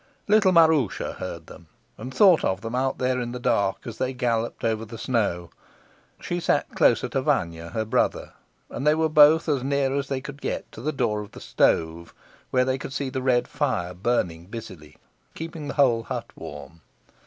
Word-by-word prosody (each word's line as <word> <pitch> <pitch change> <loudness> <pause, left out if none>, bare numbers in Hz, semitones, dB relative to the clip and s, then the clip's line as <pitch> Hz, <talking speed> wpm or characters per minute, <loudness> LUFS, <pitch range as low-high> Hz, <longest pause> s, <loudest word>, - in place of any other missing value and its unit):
Little 210 -2 +5
Maroosia 160 - +3
heard 85 -3 -6
them, 85 -1 -14 0.3
and 125 +5 -8
thought 185 +2 +5
of 95 +1 0
them 115 +1 -6
out 130 +1 0
there 125 0 0
in 120 0 -4
the 125 - -5
dark 100 -5 0
as 115 -2 -8
they 130 0 -1
galloped 120 -2 -2
over 110 -1 0
the 115 +1 -9
snow. 100 -9 -1 0.7
She 175 - -3
sat - - 0
closer - - +3
to - - -1
Vanya, 85 0 -1
her 110 +5 -2
brother, 110 - 0 0.3
and 140 - -4
they 150 - +5
were 160 0 +1
both 155 +1 +6
as 145 -4 +1
near 135 0 0
as 140 -1 -1
they 135 -1 -2
could 140 +1 -9
get - - -4
to - - -10
the 150 +5 -1
door 115 -7 -1
of 105 - -11
the - - -10
stove, 80 +1 0 0.3
where 125 0 +2
they 130 0 -1
could 135 - -7
see 135 -2 -3
the 130 - -3
red 125 -2 +2
fire 105 -11 -2
burning 90 -4 -1
busily, 95 - -10 0.4
keeping 160 -2 -6
the 140 - -5
whole 125 -6 +3
hut - - -6
warm. 80 +1 -10
125 Hz, 195 wpm, -25 LUFS, 100-140 Hz, 0.7 s, both